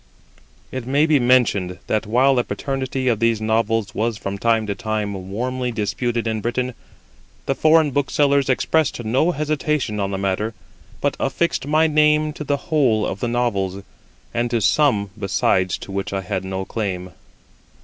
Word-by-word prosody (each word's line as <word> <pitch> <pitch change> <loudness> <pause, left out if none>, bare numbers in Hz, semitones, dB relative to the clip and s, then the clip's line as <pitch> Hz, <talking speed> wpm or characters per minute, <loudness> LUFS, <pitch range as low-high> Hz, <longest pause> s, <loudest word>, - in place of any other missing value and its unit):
It 130 -2 -5
may 140 +3 +3
be 155 -3 +3
mentioned 120 -8 +2
that, 110 0 -1
while 130 +5 +4
the 125 -2 +2
paternity 135 -1 -3
of 115 -4 +2
these 115 -1 +2
Novels 110 -1 0
was 115 0 -1
from 100 0 -5
time 115 -1 +2
to 100 - -2
time 100 -2 -3
warmly 125 +4 -2
disputed 115 +2 -2
in 110 -1 -1
Britain, 125 +3 -2 0.7
the - - +1
foreign 155 +1 +4
booksellers 140 0 +2
expressed 130 0 +1
no 130 +9 +2
hesitation 150 -7 -1
on 100 -1 -1
the 100 - -3
matter, 100 +3 -1 0.5
but - - 0
affixed 170 -5 -1
my 155 +2 +3
name 150 0 +3
to 150 - -6
the 145 -1 0
whole 135 -8 +1
of 95 - -4
the 120 - -1
Novels, 100 -6 -1 0.5
and 120 +1 0
to 120 -1 +1
some 105 -4 +2
besides 95 -2 +1
to - - -10
which 100 0 -3
I 95 - -1
had 95 0 -3
no 95 0 -4
claim. 95 -5 -4
120 Hz, 165 wpm, -21 LUFS, 100-135 Hz, 0.7 s, while